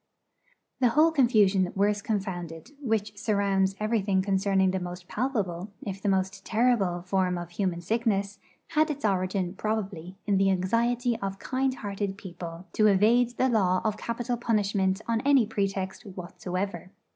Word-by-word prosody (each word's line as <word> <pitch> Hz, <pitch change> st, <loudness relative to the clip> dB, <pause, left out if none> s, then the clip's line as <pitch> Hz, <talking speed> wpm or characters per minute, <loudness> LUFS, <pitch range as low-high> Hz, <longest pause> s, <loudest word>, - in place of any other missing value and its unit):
The 255 Hz, -, +4 dB
whole 310 Hz, +7 st, +4 dB
confusion 210 Hz, -, +3 dB
worse 205 Hz, +1 st, +2 dB
confounded, 190 Hz, -, -4 dB
which 220 Hz, -5 st, -1 dB
surrounds 200 Hz, -3 st, +1 dB
everything 205 Hz, -3 st, +1 dB
concerning 195 Hz, -1 st, +2 dB
the 190 Hz, -, -1 dB
most 180 Hz, 0 st, -7 dB
palpable, 205 Hz, -7 st, -2 dB
if 195 Hz, -4 st, -5 dB
the 205 Hz, -, 0 dB
most 190 Hz, +1 st, 0 dB
terrible, 215 Hz, -7 st, +1 dB
form 185 Hz, -1 st, 0 dB
of 175 Hz, 0 st, -6 dB
human 175 Hz, -1 st, -1 dB
sickness, 205 Hz, 0 st, -1 dB, 0.3 s
had 310 Hz, 0 st, +2 dB
its 290 Hz, -3 st, -3 dB
origin, 185 Hz, -2 st, 0 dB
probably, 195 Hz, -4 st, -3 dB
in 200 Hz, -2 st, +2 dB
the 195 Hz, 0 st, +4 dB
anxiety 230 Hz, +6 st, +1 dB
of 195 Hz, 0 st, -4 dB
kind 260 Hz, +3 st, -1 dB
hearted 200 Hz, -3 st, -4 dB
people 175 Hz, -2 st, -8 dB
to 215 Hz, -, +4 dB
evade 230 Hz, +5 st, +3 dB
the 260 Hz, -, +3 dB
law 190 Hz, -7 st, +2 dB
of 215 Hz, -2 st, 0 dB
capital 240 Hz, +2 st, -3 dB
punishment 205 Hz, -4 st, +1 dB
on 230 Hz, -1 st, +1 dB
any 275 Hz, -3 st, +4 dB
pretext 195 Hz, -3 st, -2 dB
whatsoever. 185 Hz, -1 st, -5 dB
200 Hz, 145 wpm, -27 LUFS, 190-225 Hz, 0.3 s, The